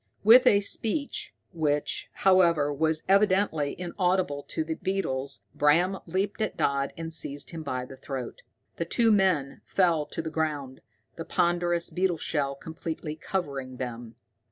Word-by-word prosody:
With 235 Hz, +4 st, +8 dB
a 200 Hz, -, +6 dB
screech, 285 Hz, -, -2 dB, 0.2 s
which, 150 Hz, -3 st, -1 dB
however, 170 Hz, -6 st, +3 dB
was 160 Hz, +2 st, 0 dB
evidently 190 Hz, -7 st, +2 dB
inaudible 180 Hz, -4 st, 0 dB
to 160 Hz, -, -2 dB
the 160 Hz, +1 st, -3 dB
beetles, 140 Hz, -8 st, -3 dB
Bram 175 Hz, +6 st, +3 dB
leaped 190 Hz, +5 st, -2 dB
at 215 Hz, -, -2 dB
Dodd 140 Hz, 0 st, 0 dB
and 165 Hz, 0 st, -5 dB
seized 145 Hz, -2 st, -2 dB
him 165 Hz, -2 st, -6 dB
by 130 Hz, -4 st, -3 dB
the 130 Hz, -, -12 dB
throat. 135 Hz, -, -6 dB, 0.4 s
The -, -, -2 dB
two 230 Hz, -2 st, +3 dB
men 185 Hz, -9 st, +2 dB
fell 170 Hz, -6 st, +2 dB
to 160 Hz, -, -4 dB
the 160 Hz, -, -4 dB
ground, 145 Hz, -5 st, -3 dB, 0.4 s
the 165 Hz, -, -5 dB
ponderous 175 Hz, 0 st, +1 dB
beetle 180 Hz, -2 st, 0 dB
shell 140 Hz, -3 st, -1 dB
completely 160 Hz, +1 st, -6 dB
covering 140 Hz, -7 st, -4 dB
them. 120 Hz, -2 st, -6 dB
160 Hz, 145 wpm, -27 LUFS, 145-190 Hz, 0.4 s, With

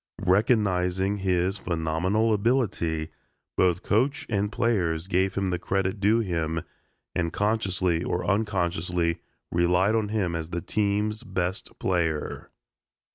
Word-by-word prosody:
Recognizing 95 Hz, -2 st, +2 dB
his 95 Hz, 0 st, 0 dB
phenomenal 90 Hz, +7 st, +1 dB
ability, 100 Hz, -9 st, 0 dB, 0.5 s
both 90 Hz, 0 st, +2 dB
coach 140 Hz, +9 st, +1 dB
and 100 Hz, 0 st, 0 dB
players 90 Hz, -9 st, 0 dB
gave 95 Hz, 0 st, +1 dB
him 95 Hz, -1 st, 0 dB
the 90 Hz, -, -1 dB
credit 95 Hz, +2 st, -1 dB
due 105 Hz, +4 st, +3 dB
him 80 Hz, -5 st, -1 dB, 0.5 s
and 85 Hz, -2 st, -1 dB
consciously 95 Hz, -5 st, 0 dB
or 90 Hz, -, -2 dB
unconsciously 90 Hz, -5 st, 0 dB, 0.3 s
relied 90 Hz, +4 st, +3 dB
on 110 Hz, -2 st, +1 dB
him 100 Hz, -5 st, 0 dB
as 80 Hz, -1 st, -4 dB
the 85 Hz, -, -2 dB
team's 105 Hz, +2 st, 0 dB
best 95 Hz, -1 st, -3 dB
player. 80 Hz, -4 st, -1 dB
95 Hz, 120 wpm, -26 LUFS, 85-105 Hz, 0.5 s, due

